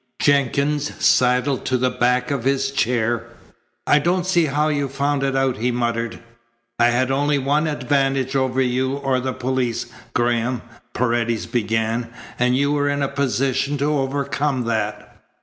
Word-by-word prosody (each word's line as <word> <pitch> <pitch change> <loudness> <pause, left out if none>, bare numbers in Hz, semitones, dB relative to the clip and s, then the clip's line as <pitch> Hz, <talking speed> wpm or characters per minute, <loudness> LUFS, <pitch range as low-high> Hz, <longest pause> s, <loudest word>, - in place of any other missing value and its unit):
Jenkins 145 +1 +1
sidled 125 +2 +2
to 130 - +1
the 125 0 +1
back 125 +1 +1
of 135 -4 -2
his 135 +1 +1
chair. 120 -3 0 0.6
"I 145 - +4
don't 175 +4 0
see 175 -3 +3
how 150 +1 +1
you 145 -2 0
found 140 +1 -1
it 135 -1 0
out," 135 -2 +1
he 120 +4 0
muttered. 115 -1 -1 0.6
"I 120 - +5
had 130 +2 +1
only 145 +2 +1
one 145 +3 +1
advantage 135 -2 0
over 130 -1 +1
you 130 +1 0
or 135 -2 0
the 130 +1 -2
police, 130 -2 -2 0.3
Graham," 120 0 0 0.3
Paredes 120 -2 0
began, 115 0 -1 0.3
"and 125 +1 +3
you 140 +1 +1
were 145 -1 +1
in 145 0 0
a - - +1
position 135 +1 0
to 145 +2 0
overcome 140 0 -1
that. 110 -2 -3
130 Hz, 155 wpm, -21 LUFS, 125-140 Hz, 0.6 s, I